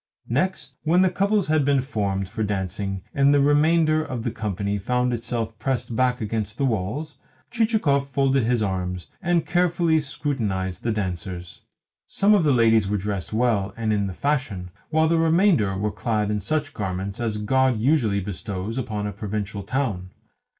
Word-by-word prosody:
Next, 145 +11 -1
when 180 +4 +4
couples 200 +1 +1
had 155 -1 +2
been 140 0 +3
formed 100 -7 -2
for 110 +4 -5
dancing 95 -1 -2
and 140 0 +4
the 145 - +4
remainder 155 +2 +3
of 130 -6 -5
the 120 - -1
company 100 -2 -2
found 125 +4 0
itself 115 -2 -3
pressed 120 -1 -2
back 125 0 +2
against 110 0 -3
the 140 - +1
walls, 125 +7 -2 0.3
Chichikov 215 -12 +1
folded 135 -1 +2
his 120 -1 +1
arms, 90 -2 -2 0.2
and 175 -3 +1
carefully 175 -2 +2
scrutinised 110 -11 -2
the 115 - -1
dancers. 90 -3 -4 0.5
Some 200 +2 +3
of 200 -5 +4
the 150 - +3
ladies 115 -4 +4
were 105 +1 0
dressed 100 -3 -4
well 110 -3 +1
and 110 -2 0
in 100 -1 0
the 95 - -5
fashion, 110 -11 -2 0.2
while 160 0 +3
the 165 0 +2
remainder 165 - +3
were 105 +2 -1
clad 105 0 -1
in 105 - 0
such 150 +5 -2
garments 95 0 -4
as 110 -3 -1
God 130 +3 +2
usually 115 -5 +2
bestows 100 +3 -4
upon 105 -4 -3
a 105 - -3
provincial 105 -1 -4
town. 100 -5 -2
115 Hz, 165 wpm, -24 LUFS, 100-145 Hz, 0.5 s, when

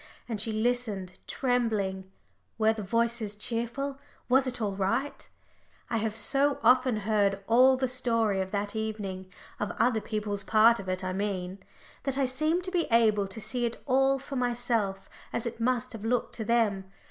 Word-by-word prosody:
And 220 -4 -3
she 220 - -2
listened, 215 -5 -1
trembling. 210 -7 -1 0.5
Were 220 0 +3
the 220 - -6
voices 230 0 -1
cheerful? 235 +6 -3 0.3
was 265 +1 +4
it 250 -1 -3
all 205 -3 -2
right? 230 +9 -2 0.6
I 230 - +1
have 220 -1 -2
so 275 +5 +3
often 250 -3 +4
heard 200 -2 +1
all 255 +4 +5
the 260 0 0
story 230 -6 +1
of 190 - -3
that 205 +1 -2
evening 200 -4 -4 0.3
of 210 - -1
other 225 -1 +2
people's 210 -2 -3
part 225 +3 +5
of 190 -1 -6
it, 185 0 -2
I 185 0 -2
mean 190 -1 -3 0.4
that 275 -1 -1
I 275 - +2
seem 310 +7 0
to 370 - -4
be 350 -3 +1
able 215 -4 +3
to 195 +4 -6
see 225 +3 -2
it 235 - -3
all 270 0 +3
for 275 +1 -8
myself 235 -6 -1 0.2
as 235 - -2
it 235 0 -5
must 245 0 0
have 220 -2 -8
looked 235 +2 0
to 220 - -4
them. 215 -4 +1
225 Hz, 175 wpm, -28 LUFS, 205-250 Hz, 0.6 s, all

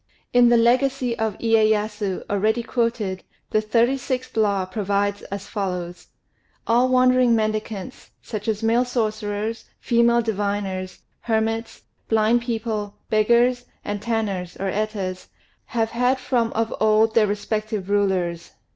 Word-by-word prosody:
In 245 -1 +6
the 240 - +5
"Legacy 250 +1 +2
of 220 -3 -1
Iyéyasu," 215 -3 +1
already 215 +4 +1
quoted, 230 -6 -1 0.3
the 215 - +2
36th 250 +4 0
Law 200 -4 +2
provides 200 +1 -1
as 200 0 -6
follows: 180 -5 -4 0.6
"All 245 +3 +3
wandering 255 -1 +4
mendicants, 215 +1 -3
such 215 -2 -6
as 220 0 -1
male 230 +2 +3
sorcerers, 220 -2 -2
female 235 0 +3
diviners, 200 -3 -3 0.2
hermits, 225 0 -2 0.3
blind 225 +2 +3
people, 220 -3 -3 0.2
beggars, 240 +3 +3 0.2
and 205 -1 -3
tanners 205 -6 -2
(Etas), 195 -1 -3 0.4
have 225 -2 -1
had 250 +3 +2
from 245 -3 0
of 225 0 -1
old 220 +1 +3
their 225 -2 +4
respective 210 0 -3
rulers. 185 -4 0
220 Hz, 120 wpm, -23 LUFS, 205-235 Hz, 0.6 s, In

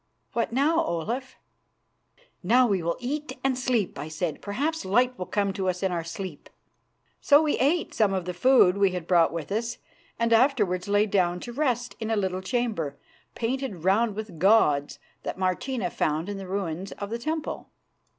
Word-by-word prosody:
What 235 - 0
now, 305 +7 +2
Olaf?" 235 - -3 1.1
"Now 245 +7 +4
we 200 -6 +1
will 170 +1 -1
eat 270 +2 -4
and 270 -1 +2
sleep," 245 - -1
I 150 - -5
said. 160 0 -3
"Perhaps 290 +11 -2
light 245 +6 +2
will 180 - -6
come 200 -2 0
to 190 -1 -1
us 180 +1 -3
in 190 - +1
our 170 -2 -2
sleep." 165 -1 -7 0.7
So 290 +2 +6
we 300 - 0
ate 285 -1 +1
of 195 -4 +2
the 180 - -3
food 200 -2 +5
we 195 -2 +3
had 180 -2 -4
brought 170 -2 +4
with 165 0 -5
us, 230 +3 -2 0.4
and 230 0 +2
afterwards 220 -8 +2
lay 205 +1 +3
down 180 -4 +1
to 240 - -7
rest 250 -3 -1
in 220 -1 -3
a 225 - +2
little 190 -2 -1
chamber, 190 - -2 0.4
painted 235 - -3
round 205 +3 +2
with 215 -6 -7
gods, 150 -8 +3 0.2
that - - -5
Martina 185 +2 -1
found 155 +5 -1
in 205 - -4
the 190 - -7
ruins 190 -1 -3
of 200 +1 -7
the 230 - -2
temple. 310 +4 -4
205 Hz, 180 wpm, -26 LUFS, 180-245 Hz, 1.1 s, So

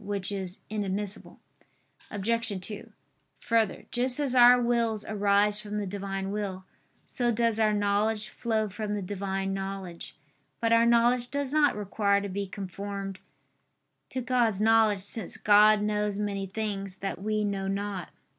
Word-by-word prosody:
Which 200 -1 -3
is 190 -2 -5
inadmissible. 205 -1 -4 0.7
Obj. 225 0 -1
2: 205 +3 -8 0.5
Further, 225 -4 +1
just 250 +2 0
as 280 -4 0
our 245 0 +8
wills 235 -3 0
arise 205 0 +2
from 210 -1 -5
the 205 - -2
Divine 195 0 -4
will, 195 -3 -4 0.4
so 245 -1 -1
does 230 -1 +1
our 215 -1 +4
knowledge 210 +1 0
flow 220 -2 -1
from 210 +1 -4
the 205 - -3
Divine 195 0 -3
knowledge. 195 -3 -6 0.4
But 230 0 +2
our 230 0 +5
knowledge 240 +1 +3
does 280 0 -3
not 300 -2 +4
require 200 0 +1
to 200 0 -5
be 200 +1 -3
conformed 195 0 -6 0.9
to 260 - -3
God's 240 -5 +1
knowledge; 220 -2 +4
since 205 -1 -5
God 210 0 +5
knows 210 -1 0
many 200 -2 -2
things 195 -2 -4
that 195 -1 -4
we 215 +1 0
know 195 -2 -2
not. 195 -2 -3
205 Hz, 145 wpm, -28 LUFS, 195-225 Hz, 0.9 s, our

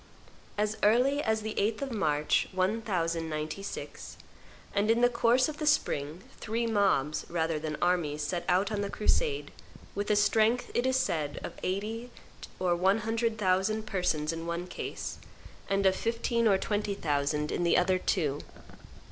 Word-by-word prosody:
As 210 +1 0
early 250 +7 +4
as 220 -4 0
the 220 - -3
8th 215 +5 0
of 270 - -4
March, 150 -9 +1
1096, 175 -4 -2 0.6
and 205 +2 +1
in 230 +1 +3
the 245 - +6
course 245 +1 +3
of 305 -1 -6
the 305 - -2
spring 155 - +1 0.2
three 230 +2 -1
mobs 195 -10 +1
rather 165 -2 0
than 155 -1 -4
armies 160 -4 +1
set 170 +4 -2
out 190 +3 +2
on 205 -1 -1
the 200 - -2
crusade, 425 - 0 0.4
with 205 +1 -3
a 210 - +4
strength, 220 +3 +2
it 245 +2 +1
is 260 0 +2
said, 160 - -1
of - - -5
eighty 215 +6 -3 0.5
or 180 -2 +1
one 190 +5 +2
hundred 225 +1 -1
thousand 205 +2 +1
persons 165 -6 0
in 165 0 -5
one 170 +1 -3
case, 180 - -6 0.5
and 195 0 +1
of 190 0 +5
fifteen 230 +1 0
or 195 -2 +5
twenty 205 0 -1
thousand 150 -2 -1
in - - -1
the 170 - +4
other 185 +1 +3
two. 150 -7 0
200 Hz, 160 wpm, -29 LUFS, 170-225 Hz, 0.6 s, the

